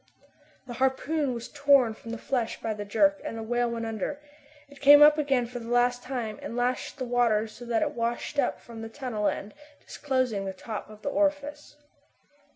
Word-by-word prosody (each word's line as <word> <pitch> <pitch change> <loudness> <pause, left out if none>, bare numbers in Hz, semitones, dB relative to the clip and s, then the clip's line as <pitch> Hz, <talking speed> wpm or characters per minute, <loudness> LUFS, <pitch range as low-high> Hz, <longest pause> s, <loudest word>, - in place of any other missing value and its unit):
The 245 - -7
harpoon 275 +2 +1
was 235 0 -6
torn 280 -5 +4
from 230 - -12
the 230 - -4
flesh 240 -1 -2
by 225 - -2
the 205 -1 -6
jerk, 200 -1 +2
and 225 - -5
the 225 - -5
whale 240 +1 0
went 230 -1 -3
under. 225 +6 -3 0.5
It 280 0 -17
came 290 +1 +9
up 300 +1 +7
again 270 -5 +1
for 245 +1 -7
the 230 - -9
last 245 0 +2
time, 240 -5 -4
and 230 - -6
lashed 250 +3 -1
the 260 - -3
water 235 -3 +2
so 235 +2 -11
that 235 -2 +1
it - - -1
washed 235 +4 -2
up 265 - 0
from 230 -1 -11
the 225 - -6
tunnel 225 -5 -3
end, 205 - -3 0.3
disclosing 255 -8 -1
the 190 - -4
top 215 +3 -7
of 215 0 -14
the - - -1
orifice. 290 0 -1
245 Hz, 200 wpm, -27 LUFS, 225-275 Hz, 0.5 s, came